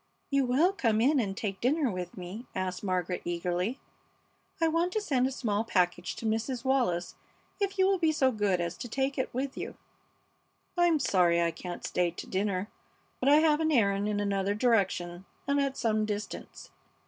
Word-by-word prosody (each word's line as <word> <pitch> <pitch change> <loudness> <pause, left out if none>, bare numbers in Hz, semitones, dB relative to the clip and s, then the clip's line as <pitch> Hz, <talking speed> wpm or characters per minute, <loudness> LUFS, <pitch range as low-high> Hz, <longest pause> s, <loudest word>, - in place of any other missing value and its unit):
"You 275 -1 +3
will 310 +10 +3
come 225 - +1
in 275 +5 +4
and 195 -4 -2
take 195 -4 -3
dinner 275 0 +2
with 180 -1 -6
me?" 190 +7 -7
asked 185 0 -3
Margaret, 180 -2 -1
eagerly. 175 +7 -1 0.8
"I 330 - +3
want 335 +3 +1
to 435 - +1
send 265 -11 +1
a - - -3
small 215 -5 -1
package 180 -4 0
to - - -7
Mrs. 225 +4 -1
Wallis 245 -10 +1 0.5
if 395 -1 -1
you 380 - +4
will 385 -1 +2
be 325 -2 +3
so 270 -4 +2
good 205 -5 +1
as 170 0 -2
to 245 - -6
take 270 +3 -1
it 260 - -1
with 265 +2 -3
you." - - -6 1.0
"I'm 345 -2 +4
sorry 180 - +3
I 170 -1 +2
can't 175 +1 -7
stay 180 -1 +1
to 170 - -8
dinner, 195 0 -1 0.5
but 265 - +2
I 295 +2 +7
have 310 -2 +4
an 315 -1 +1
errand 200 -5 +2
in 205 -1 0
another 200 0 0
direction 190 -6 +1 0.2
and 280 0 +2
at 275 -1 -1
some 215 -2 +1
distance. 210 0 -6
220 Hz, 185 wpm, -29 LUFS, 185-275 Hz, 1.0 s, I